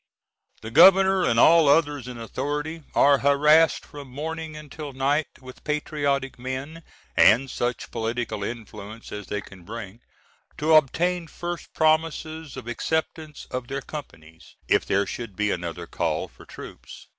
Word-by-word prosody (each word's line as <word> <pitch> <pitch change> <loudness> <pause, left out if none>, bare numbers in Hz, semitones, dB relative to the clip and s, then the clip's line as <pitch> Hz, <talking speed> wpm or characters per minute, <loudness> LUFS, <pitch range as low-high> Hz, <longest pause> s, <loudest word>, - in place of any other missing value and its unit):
The 110 - -6
Governor, 190 +4 +7
and 115 -8 +2
all 165 +3 +6
others 145 -4 +2
in 125 -1 -7
authority, 145 +7 -4
are 140 -1 +5
harassed 150 +3 +4
from 145 -2 -11
morning 160 +3 -5
until 150 -1 -8
night 140 +3 +1
with 130 -1 -13
patriotic 145 -3 -1
men, 130 +6 -5 0.3
and 125 +6 +5
such 120 0 -3
political 115 -2 -3
influence 110 -1 -8
as 105 -1 -7
they 105 - -3
can 95 -3 -14
bring, 110 +3 -9 0.6
to 155 +2 +2
obtain 165 +4 +3
first 175 +2 -6
promises 160 -1 0
of 125 -3 -8
acceptance 155 +4 -3
of 125 -1 -4
their 135 0 -4
companies, 80 - -11
if - - +2
there 100 +1 +2
should 105 +1 -6
be 105 +1 0
another 85 0 -4
call - - -2
for - - -17
troops. - - -11
140 Hz, 145 wpm, -25 LUFS, 115-155 Hz, 0.6 s, Governor